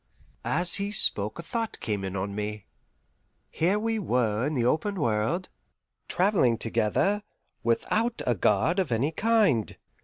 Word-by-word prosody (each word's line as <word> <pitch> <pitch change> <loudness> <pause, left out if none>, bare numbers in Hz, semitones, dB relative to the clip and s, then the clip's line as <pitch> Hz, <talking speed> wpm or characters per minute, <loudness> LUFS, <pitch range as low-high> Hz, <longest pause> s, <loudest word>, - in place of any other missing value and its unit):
As 175 +1 +1
he 200 0 -2
spoke 105 - +2
a 170 - -6
thought 225 +5 -3
came 105 -3 -3
in 95 0 -4
on 100 +1 -3
me. 105 0 -4 0.9
Here 180 +6 +1
we 225 +1 -1
were 120 - 0
in 155 - -2
the 120 -3 +1
open 200 - +1
world, 120 - 0 0.6
travelling 180 - +2
together, 115 - 0 0.4
without 220 - 0
a 125 - +2
guard 105 - +2
of 180 -9 -1
any 125 +7 +1
kind. 205 - +2
145 Hz, 145 wpm, -27 LUFS, -, 0.9 s, spoke